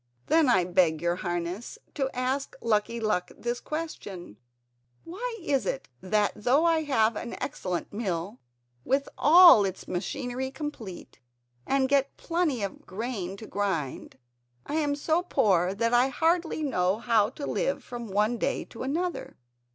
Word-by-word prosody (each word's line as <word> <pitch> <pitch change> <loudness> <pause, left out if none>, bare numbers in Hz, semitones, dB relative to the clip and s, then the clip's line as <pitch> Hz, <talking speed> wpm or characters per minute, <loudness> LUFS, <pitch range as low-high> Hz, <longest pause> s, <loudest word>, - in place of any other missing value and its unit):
"Then 320 -4 +4
I 185 -7 +4
beg 175 -3 +2
your 175 +1 0
Highness 175 - -4 0.2
to 270 -3 -1
ask 260 +2 -2
Lucky 230 +1 0
Luck 210 -5 0
this 240 +1 -3
question: 205 - -6 0.7
Why 455 +7 -5
is 275 -5 0
it - - -3
that 205 +2 +1
though 265 +9 +2
I 330 -1 +3
have 225 -5 +2
an 235 - -5
excellent 185 -12 -4
mill, 200 -1 -3 0.4
with 275 +1 +1
all 335 - +8
its 190 -1 -4
machinery 245 +7 -3
complete, 265 - -7 0.5
and 270 -1 +2
get 275 0 +1
plenty 330 - -1
of 200 - -5
grain 195 -2 -4
to 220 - -9
grind, 190 -14 -3 0.5
I - - -6
am 290 -2 +1
so 315 +4 +1
poor 195 - +2
that 230 +3 0
I 245 +2 +5
hardly 325 +2 0
know 185 -8 +1
how 225 -3 +2
to 280 +3 -7
live - - -1
from 240 -2 -7
one 210 +4 +1
day - - -1
to - - -11
another?" 340 +7 -3
240 Hz, 150 wpm, -27 LUFS, 195-290 Hz, 0.7 s, all